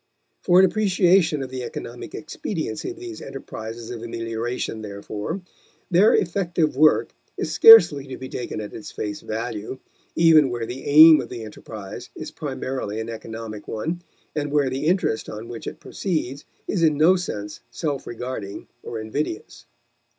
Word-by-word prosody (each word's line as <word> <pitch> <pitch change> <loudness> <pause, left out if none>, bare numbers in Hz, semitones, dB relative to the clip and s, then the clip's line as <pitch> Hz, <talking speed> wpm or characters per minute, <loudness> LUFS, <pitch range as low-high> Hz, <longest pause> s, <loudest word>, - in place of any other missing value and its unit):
For 180 -1 +4
an 190 - +8
appreciation 180 -6 +3
of 130 - -8
the 130 -1 -4
economic 120 0 -7
expediency 155 - -4
of 360 - -8
these 355 -2 -8
enterprises 115 -4 -7
of 120 -2 -6
amelioration, 115 0 -4
therefore, 105 - -5 0.5
their 185 +5 +6
effective 170 -4 0
work 155 +3 +4 0.2
is - - -2
scarcely 155 - +8
to 130 - -7
be 130 - -7
taken 120 -4 -5
at 105 - -8
its 110 - -8
face 105 -1 -5
value, 110 +1 -4 0.4
even 160 -4 +6
where 120 -2 -3
the 125 +3 -7
aim 155 +2 +9
of - - -8
the 120 -2 -6
enterprise 105 -2 -9
is - - -7
primarily 130 -5 -4
an 110 +1 -4
economic 110 -1 -7
one 160 +11 -3 0.3
and 145 -1 -2
where 145 -3 +2
the 135 +4 -2
interest 175 - +1
on 110 +2 -7
which 115 - -8
it - - -6
proceeds 150 -7 -3 0.2
is 185 - -1
in 155 -3 +3
no 165 +5 +6
sense 105 - -5
self 140 +2 -3
regarding 115 -4 -6 0.2
or 115 - -6
invidious. 110 +2 -4
130 Hz, 160 wpm, -23 LUFS, 110-160 Hz, 0.5 s, aim